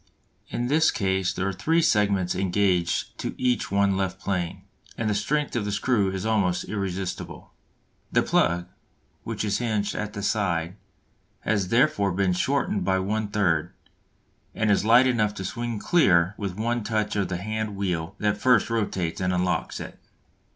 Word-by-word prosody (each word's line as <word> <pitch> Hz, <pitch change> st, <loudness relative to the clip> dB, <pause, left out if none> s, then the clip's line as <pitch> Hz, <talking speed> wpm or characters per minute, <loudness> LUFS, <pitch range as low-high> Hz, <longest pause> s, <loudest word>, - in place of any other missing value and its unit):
In 120 Hz, -, -2 dB
this 155 Hz, +5 st, +3 dB
case 95 Hz, -3 st, 0 dB
there 95 Hz, +1 st, -2 dB
are 100 Hz, -, -1 dB
three 160 Hz, -, +1 dB
segments 100 Hz, -, +2 dB
engaged 90 Hz, -2 st, 0 dB
to -, -, -4 dB
each 125 Hz, -1 st, 0 dB
one 100 Hz, 0 st, +2 dB
left 95 Hz, -1 st, -2 dB
plane, 95 Hz, -1 st, -3 dB, 0.3 s
and 115 Hz, -, -1 dB
the 105 Hz, -, +1 dB
strength 145 Hz, +9 st, -1 dB
of 120 Hz, -, 0 dB
the 105 Hz, -, -2 dB
screw 100 Hz, -2 st, +1 dB
is 95 Hz, +1 st, -4 dB
almost 100 Hz, -5 st, +1 dB
irresistible. 95 Hz, -3 st, -5 dB, 0.6 s
The -, -, +3 dB
plug, 85 Hz, +1 st, +2 dB, 0.6 s
which -, -, -3 dB
is 100 Hz, -1 st, 0 dB
hinged 110 Hz, -4 st, -1 dB
at 105 Hz, -1 st, -4 dB
the 100 Hz, -, -5 dB
side, 90 Hz, -4 st, 0 dB, 0.7 s
has 100 Hz, -3 st, 0 dB
therefore 115 Hz, -2 st, +2 dB
been 95 Hz, 0 st, +1 dB
shortened 105 Hz, -1 st, 0 dB
by 95 Hz, +1 st, +2 dB
one 105 Hz, +3 st, -1 dB
third, 95 Hz, -7 st, 0 dB, 0.8 s
and 110 Hz, -1 st, +1 dB
is 100 Hz, -, +3 dB
light 120 Hz, +4 st, +6 dB
enough 110 Hz, -5 st, +1 dB
to 95 Hz, -, -5 dB
swing 120 Hz, +4 st, -3 dB
clear 95 Hz, -, +3 dB
with 100 Hz, -4 st, -4 dB
one 120 Hz, +1 st, -1 dB
touch 105 Hz, 0 st, -1 dB
of 100 Hz, -2 st, 0 dB
the 90 Hz, -, -3 dB
handwheel 100 Hz, -4 st, -3 dB
that 105 Hz, -1 st, 0 dB
first 120 Hz, 0 st, +3 dB
rotates 95 Hz, -7 st, -1 dB
and 90 Hz, 0 st, +1 dB
unlocks 90 Hz, 0 st, -1 dB
it. -, -, -8 dB
100 Hz, 165 wpm, -25 LUFS, 95-110 Hz, 0.8 s, light